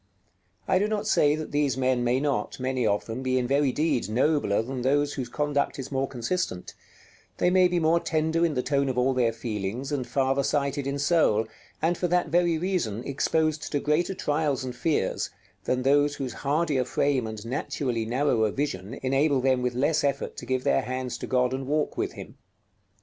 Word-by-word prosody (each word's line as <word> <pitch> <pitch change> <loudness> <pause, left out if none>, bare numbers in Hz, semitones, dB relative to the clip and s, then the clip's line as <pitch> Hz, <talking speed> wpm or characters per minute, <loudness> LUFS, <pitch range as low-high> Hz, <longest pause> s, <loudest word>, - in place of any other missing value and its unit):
I 185 - +3
do 205 - +1
not 215 -1 -2
say 150 -8 +3
that 155 0 -6
these 145 -3 +1
men 130 -1 +1
may 125 +2 +2
not, 140 -2 -2
many 130 -2 0
of 100 0 0
them, 115 +3 -5
be 130 0 0
in 125 - +1
very 140 +1 +2
deed 145 - 0
nobler 125 -3 +2
than 130 +1 -5
those 145 +3 +1
whose 130 -4 -4
conduct 145 -1 -1
is 135 0 -6
more 135 0 0
consistent; 125 - -3 0.6
they 180 - +2
may 185 0 +5
be 175 -1 0
more 165 +1 +3
tender 160 +1 0
in 165 -4 +1
the 125 - 0
tone 140 -1 +1
of 130 - -3
all 130 +2 +2
their 120 -3 +2
feelings, 115 +3 -4
and 135 -4 -2
farther 135 0 +1
sighted 140 0 -1
in 140 +1 -2
soul, 140 -7 +3 0.4
and 170 +1 +1
for 180 - +1
that 175 -1 +1
very 170 0 +2
reason 160 - -1
exposed 155 +3 0
to 145 - +1
greater 165 +6 0
trials 145 -4 0
and 125 -1 -5
fears, 155 +5 0 0.4
than 125 0 0
those 145 +2 +3
whose 130 -3 -4
hardier 145 -2 +1
frame 130 -1 0
and 110 0 -7
naturally 125 -1 -2
narrower 120 -2 +1
vision 115 -3 -3
enable 135 +2 +2
them 130 -1 +2
with 125 -1 -1
less 145 +5 +1
effort 140 -1 -1
to - - -8
give 130 -1 0
their 70 - +2
hands 130 -1 -4
to - - -6
God 125 0 +1
and 135 0 -4
walk 150 +1 0
with - - -2
Him. - - -11
135 Hz, 200 wpm, -26 LUFS, 125-150 Hz, 0.6 s, may